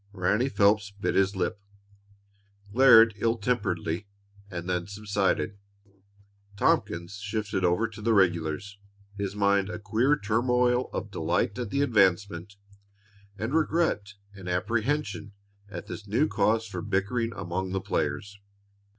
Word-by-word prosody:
Ranny 105 +7 +1
Phelps 105 -3 +3
bit 100 0 -3
his 95 +1 +2
lip, 100 +3 -2 1.1
glared 115 -3 +7
ill 115 +2 +1
temperedly, 100 -5 -1 0.4
and 90 -2 -6
then 90 -1 -1
subsided. 100 0 -1 1.0
Tompkins 85 0 0
shifted 105 -1 -3
over 90 +6 +2
to 110 0 -11
the 115 +1 +2
regulars, 90 +1 0 0.4
his 100 -1 -4
mind 100 -1 +2
a - - -4
queer 115 +8 +1
turmoil 125 +3 +1
of 105 - -5
delight 90 +6 -1
at 120 -4 -3
the 140 +5 +1
advancement, 100 -5 +1 0.8
and 110 +6 -3
regret 155 -11 0 0.2
and 95 -2 -8
apprehension 110 +3 -1 0.4
at 90 -4 -7
this 105 - -8
new 115 +10 +2
cause 110 +2 +1
for 95 -5 -6
bickering 115 +6 -1
among 95 0 -3
the 95 - -1
players. 100 +1 -3
100 Hz, 125 wpm, -27 LUFS, 95-115 Hz, 1.1 s, glared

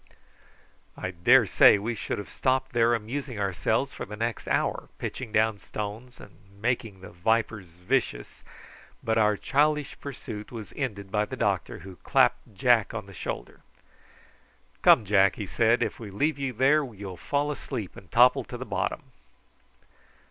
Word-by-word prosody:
I 95 - -4
daresay 85 +3 +6
we 110 +4 -3
should 115 - -4
have 105 - -6
stopped 130 0 -1
there 120 0 +4
amusing 125 +3 -5
ourselves 100 -2 0
for - - -6
the 105 - -7
next 115 +1 -3
hour, - - -1
pitching 125 -4 -5
down 110 -1 +2
stones 110 +5 -7
and 100 -4 -14 0.2
making 115 -4 -2
the - - -10
vipers 110 +2 0
vicious; 110 - -1 0.6
but 115 0 +1
our 105 -1 +3
childish 150 +1 +1
pursuit 110 -6 -8
was 115 -3 -8
ended 100 -8 -4
by 105 0 +1
the 130 - -7
doctor, 100 -6 -1
who 95 -2 -10
clapped 100 - +1
Jack 115 +1 +3
on 110 -3 -4
the 100 - -13
shoulder. - - -6 1.2
"Come, 110 - +6
Jack," 100 -1 +4
he 105 - -5
said, 115 +5 +2
"if 110 - -4
we 110 -3 -7
leave 145 +9 -1
you 135 -2 -1
there 135 +6 +3
you'll 100 -7 -8
fall 145 - -1
asleep 125 -8 -6
and 95 - -14
topple 125 +2 +5
to 120 - -7
the 130 - -6
bottom." - - -2
110 Hz, 155 wpm, -27 LUFS, 100-125 Hz, 1.2 s, daresay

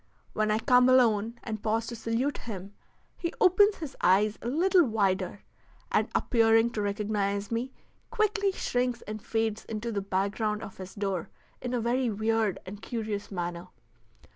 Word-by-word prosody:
When 215 0 +1
I 215 - +3
come 250 +2 +5
alone 230 -2 +3
and 215 -2 -5
pause 225 +1 0
to 235 - -6
salute 230 +5 -1
him, 200 -3 -7 0.4
he 340 - -3
opens 405 +1 +5
his 300 -5 -7
eyes 205 +4 +3
a - - -5
little 355 +7 +4
wider, 200 - 0 0.5
and, - - +2
appearing 225 0 +4
to 215 - -2
recognize 205 0 -1
me, 235 +3 -2 0.4
quickly 420 -2 +1
shrinks 250 -8 -1
and 215 0 -6
fades 225 0 -1
into 225 +1 -4
the 200 -2 -1
background 200 +2 -1
of 195 - -9
his 185 0 -9
door 195 -4 -2 0.3
in 250 0 -2
a - - +1
very 240 +2 +1
weird 220 -1 0
and 200 +3 -8
curious 215 -4 -4
manner. 175 -2 -4
220 Hz, 160 wpm, -28 LUFS, 205-245 Hz, 0.5 s, come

